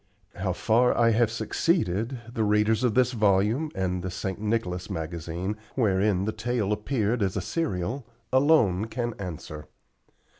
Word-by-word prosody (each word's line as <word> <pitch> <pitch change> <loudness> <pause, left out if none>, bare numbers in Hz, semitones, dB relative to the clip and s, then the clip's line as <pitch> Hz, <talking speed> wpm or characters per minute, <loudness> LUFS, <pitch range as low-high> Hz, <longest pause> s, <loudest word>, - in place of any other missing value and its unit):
How 95 0 -1
far 115 +6 +2
I 115 -1 +4
have 115 0 +3
succeeded, 115 - 0
the 110 - 0
readers 105 +2 +2
of 120 -4 +2
this 125 -1 +4
volume, 110 +6 +2
and 95 -1 -1
of - - -5
the 95 - -4
"St. 95 +2 -4
Nicholas" 105 -5 -2
magazine, 85 +4 -4 0.2
wherein 100 -4 +2
the 110 - 0
tale 110 -1 -1
appeared 110 0 -1
as 95 -2 0
a - - 0
serial, 120 - -2 0.3
alone 130 - +4
can 120 +1 -3
answer. 80 -5 -7
105 Hz, 150 wpm, -26 LUFS, 95-120 Hz, 0.3 s, I